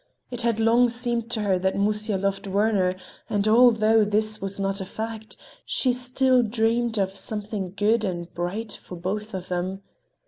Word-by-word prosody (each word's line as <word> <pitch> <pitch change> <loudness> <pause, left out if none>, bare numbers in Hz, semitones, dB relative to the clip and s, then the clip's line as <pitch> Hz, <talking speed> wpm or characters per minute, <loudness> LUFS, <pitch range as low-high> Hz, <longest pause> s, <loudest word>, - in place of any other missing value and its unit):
It 245 -1 -3
had 230 -2 0
long 235 +2 +4
seemed 235 -1 -2
to 230 -2 -1
her 190 -3 +2
that 190 +1 0
Musya 210 +1 +1
loved 195 +1 -2
Werner, 195 -2 +1 0.3
and 205 0 0
although 225 -1 +5
this 215 +1 0
was 195 0 -3
not 195 0 -1
a - - -4
fact, 220 +2 -6 0.3
she 255 -2 +1
still 255 +1 +2
dreamed 230 +1 0
of 195 -1 0
something 205 -1 -4
good 220 +2 +2
and 175 -3 -4
bright 195 +6 -3
for 180 - -10
both 200 +5 -4
of 185 -1 -6
them. 185 +2 -3
215 Hz, 170 wpm, -25 LUFS, 195-230 Hz, 0.3 s, although